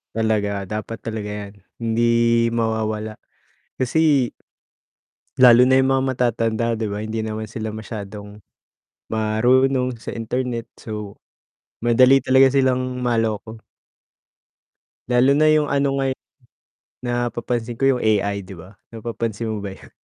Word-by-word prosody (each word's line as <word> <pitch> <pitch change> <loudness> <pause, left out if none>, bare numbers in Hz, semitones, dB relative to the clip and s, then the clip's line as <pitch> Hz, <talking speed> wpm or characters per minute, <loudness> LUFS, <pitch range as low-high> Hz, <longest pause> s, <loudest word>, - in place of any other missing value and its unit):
Talaga, 105 -3 0
dapat 110 +3 -5
talaga 110 -2 -4
'yan 105 -1 -6 0.2
hindi 115 0 -1 0.5
mawawala 110 -2 -2 0.6
kasi 140 -1 +2 1.1
lalo 125 -2 +8
na 130 0 +5
yung 130 0 +3
mga 135 0 +1
matatanda, 115 -2 0
'di 110 -1 -2
ba, 105 +1 -4
hindi 110 0 -3
naman 110 0 -4
sila 110 0 -5
masyadong 105 -1 -8 0.7
marunong 125 +4 +2
sa 110 - -7
internet, 115 0 -3
so, 105 -2 -7 0.7
madali 130 +3 +5
talaga 130 +1 +5
silang 130 -1 0
maloko. 115 -2 -1 1.5
Lalo 125 +2 +4
na 155 +1 +4
yung 155 -1 +3
ano 140 -1 +1
ngayon 135 -1 -1 0.9
napapansin 120 -1 -2
ko 135 - +1
yung 130 -2 +2
AI 100 -2 +1
'di 95 0 -11
ba, 90 +4 -13 0.2
napapansin 115 -1 -4
mo 105 - -4
ba 100 -1 -5
yun? - - -17
115 Hz, 125 wpm, -21 LUFS, 110-125 Hz, 1.5 s, lalo